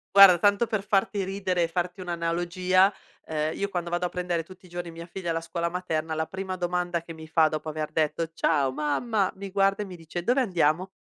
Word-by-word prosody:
Guarda, 195 -3 +10
tanto 205 +4 +4
per 215 -3 -1
farti 200 0 +1
ridere 190 -2 -1
e - - +1
farti 175 +2 -3
un'analogia, 175 +2 +1 0.3
ehm, 155 0 -2
io 200 - -1
quando 175 -3 -3
vado 175 +1 0
a - - -9
prendere 175 -2 -2
tutti 185 +2 -15
i - - -16
giorni 175 0 -5
mia 165 +1 -9
figlia 175 0 -6
alla 165 0 -1
scuola 170 +1 -2
materna, 165 -3 -2
la 160 0 0
prima 190 0 -4
domanda 175 -1 -1
che 165 0 -9
mi 160 0 -10
fa 160 0 +4
dopo 155 0 -3
aver 155 0 -4
detto: 160 +1 0
"Ciao, 145 -5 +2
mamma", 185 - 0
mi 195 0 -7
guarda 195 +1 +2
e - - -7
mi 185 -2 -9
dice: 165 +1 -6
"Dove 250 +7 +3
andiamo?" 180 - +1
175 Hz, 220 wpm, -27 LUFS, 165-190 Hz, 0.3 s, Guarda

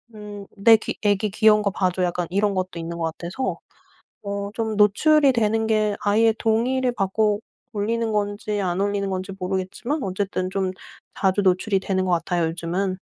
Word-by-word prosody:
음 205 -1 -9
"내 225 +3 +7
귀 215 - -5
아기 205 0 +2
귀여운 215 0 +4
거 200 - +1
봐 185 -2 +1
줘." 180 +1 -2
약간 175 -1 -1
이런 200 +2 +1
것도 185 -2 -3
있는 170 +1 -5
것 165 - 0
같아서 170 +10 -3 0.7
어 200 0 -3
좀 220 -2 -2
노출이 275 +8 +4
되는 225 -1 +1
게 215 -2 +1
아이의 220 +2 +3
동의를 245 +3 +1
받고 210 0 0 0.3
올리는 225 +2 -1
건지 205 0 -1
안 180 -1 -1
올리는 200 -1 -1
건지 190 +1 -4
모르겠지만 190 +10 -3
어쨌든 185 -1 -2
좀 190 -1 -1 0.5
자주 195 +1 +2
노출이 190 +1 +2
되는 185 -1 -1
것 185 - 0
같아요 170 0 +1
요즘은. 175 +3 -2
200 Hz, 335 characters per minute, -23 LUFS, 185-220 Hz, 0.7 s, 내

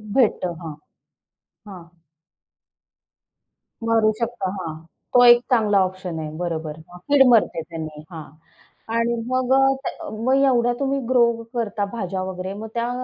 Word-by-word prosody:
भेटतं 205 -8 +2
हां, 160 -3 -7 0.9
हां. 185 -4 -10 2.0
मरू 225 -1 +3
शकता. 230 -5 -2
हां, 160 -3 -5 0.4
तो 245 0 +6
एक 240 0 +8
चांगला 210 -4 +3
ऑप्शन 185 -3 -6
आहे. 155 -1 -5
बरोबर. 160 -3 -4
हां, 180 - -13
कीड 285 -2 +6
मरते 220 -7 +3
त्यांनी, 155 -2 -8
हां 160 -3 -7 0.7
आणि 235 +1 +1
मग 255 0 +1
अ, 270 - +5 0.2
त्या - - -6
मग 235 +5 0
एवढ्या 245 -2 +2
तुम्ही 275 0 0
ग्रो 250 -2 +5 0.3
करता 215 -4 -2
भाज्या 190 -5 -3
वगैरे. 185 0 -5
मग 215 +2 -7
त्या 235 0 -1
215 Hz, 140 wpm, -22 LUFS, 175-240 Hz, 2.0 s, एक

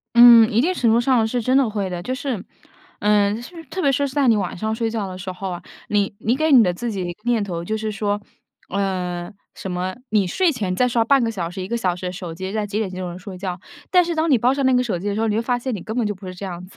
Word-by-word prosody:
嗯， 235 -2 +9
一 225 - +3
定 345 +7 +2
程 240 -10 +2
度 230 - +4
上 240 -3 +3
是 245 +2 -1
真 255 +3 +2
的 270 -4 +4
会 205 -3 -2
的。 175 -1 -4
就 255 +7 -3
是， 260 -7 -3 0.6
嗯， 210 +1 +2 0.3
特 375 - -3
别 280 - +4
是 280 +1 +1
在 275 0 +1
你 225 - +5
晚 190 -3 -2
上 220 +4 -2
睡 225 0 -1
觉 215 -3 -2
的 185 -1 -7
时 185 0 -5
候 185 +1 -5
啊， 175 -1 -6 0.3
你 205 -1 +1
你 230 +3 +1
给 315 +2 +1
你 250 -4 +8
的 180 - +2
自 235 +7 -4
己 180 -4 -4
念 240 -3 +2
头， 170 -3 -4
就 215 +5 -2
是 215 0 -3
说， 205 0 -1 0.5
嗯， 180 -2 -2 0.2
什 190 - -6
么 180 +1 -2 0.2
你 205 -3 +3
睡 360 - +2
前 205 -10 -2
再 250 +6 +2
刷 230 -2 +2
半 275 +1 +4
个 230 - +1
小 175 -6 -4
时、 185 +2 -7
1 185 - -6
个 235 - -1
小 185 -6 0
时 180 +1 -6
的 180 - -3
手 180 -3 -6
机， 190 +2 -5
在 215 -1 -1
几 205 +1 -3
点 215 -4 -1
就 185 0 -5
能 175 +1 -6
睡 190 0 -9
觉。 180 -1 -5 0.3
但 360 -2 +5
是 340 - -2
当 320 0 +1
你 265 - +5
抱 245 +3 +3
上 275 - -1
那 260 - +4
个 250 0 +4
手 215 -8 -2
机 200 - -4
的 200 - -1
时 215 - -2
候， 225 - +1
你 210 - 0
会 225 - +1
发 245 +1 0
现 250 0 -3
你 195 - -6
根 220 +2 -5
本 235 -3 +1
就 205 - -2
不 190 0 -12
是 185 - -6
这 190 - -8
样 180 -1 -6
子。 185 - -19
210 Hz, 320 characters per minute, -21 LUFS, 185-240 Hz, 0.6 s, 嗯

